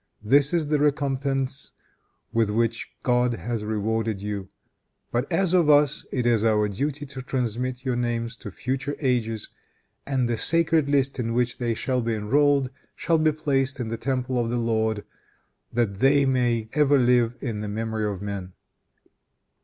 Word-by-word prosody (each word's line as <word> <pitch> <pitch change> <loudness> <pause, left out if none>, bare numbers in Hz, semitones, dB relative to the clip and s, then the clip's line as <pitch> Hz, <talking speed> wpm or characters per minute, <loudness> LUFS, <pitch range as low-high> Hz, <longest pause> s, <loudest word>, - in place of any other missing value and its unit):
This 140 +6 +4
is 165 -4 0
the 150 -1 +2
recompense 140 -2 0 0.6
with 115 -2 +2
which 115 +2 0
God 125 -1 +2
has 115 -2 -4
rewarded 110 0 -1
you. 100 -1 -5 0.6
But 120 +3 -1
as 190 -3 +2
for 175 -5 +4
us, 145 0 +2
it 125 -3 -1
is 115 -3 +3
our 105 -2 +3
duty 145 +8 -3
to 135 -1 -7
transmit 125 0 -2
your 130 -2 0
names 120 -1 -2
to 105 - -8
future 135 +7 -3
ages, 115 -6 -1 0.6
and 130 -3 +1
the 120 -1 -1
sacred 165 -3 +2
list 135 -2 +1
in 115 -1 -1
which 125 -1 0
they 120 -2 0
shall 125 +2 -1
be 115 -1 -1
enrolled 135 +5 +2 0.2
shall 165 0 +1
be 155 0 +3
placed 140 -3 -1
in 120 -3 -3
the 115 - -2
temple 130 0 -1
of 115 -1 0
the 120 - -1
Lord, 110 -2 0 0.7
that 110 -5 -1
they 140 +2 +4
may 120 -4 +1
ever 145 -1 +4
live 120 -2 +3
in 115 -5 -3
the 105 - -4
memory 110 0 -2
of 100 0 -6
men. 100 -3 -5
125 Hz, 165 wpm, -25 LUFS, 115-140 Hz, 0.7 s, This